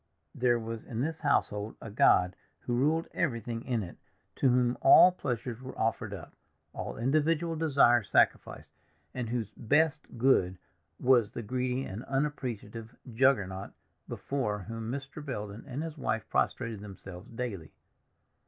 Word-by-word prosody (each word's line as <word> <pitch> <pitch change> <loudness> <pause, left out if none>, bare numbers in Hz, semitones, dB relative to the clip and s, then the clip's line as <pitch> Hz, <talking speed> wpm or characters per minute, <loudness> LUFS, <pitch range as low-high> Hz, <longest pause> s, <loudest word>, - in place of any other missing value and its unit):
There 120 -1 +2
was 115 -1 -6
in 115 0 -4
this 160 +3 -2
household 105 -8 0
a 115 - -8
god 90 -3 +4 0.3
who 120 - -3
ruled 150 +7 +1
everything 115 -5 -2
in 120 -5 -1
it, 85 - -9 0.4
to 135 - +3
whom 125 0 +2
all 180 +6 +8
pleasures 125 -7 -4
were 130 0 -9
offered 110 -1 -1
up, 95 -6 -8 0.4
all - - -5
individual 155 +7 +1
desires 135 -8 +4
sacrificed, - - +1 0.4
and 125 -3 -4
whose 115 -3 -2
Best 145 +5 0
Good 105 -8 +3 0.4
was 120 -4 +4
the 120 - -5
greedy 125 +3 -1
and 105 +6 -6
unappreciative 125 -5 -3 0.2
Juggernaut 105 -7 +1 0.4
before 105 -8 -2
whom 115 +2 -6
Mr. 140 +3 -6
Belden 105 -6 -6
and 140 +3 -4
his 160 -2 -7
wife 110 -4 -2
prostrated 115 -4 0
themselves 95 -2 -10
daily. 115 -9 -5
120 Hz, 140 wpm, -30 LUFS, 110-135 Hz, 0.4 s, all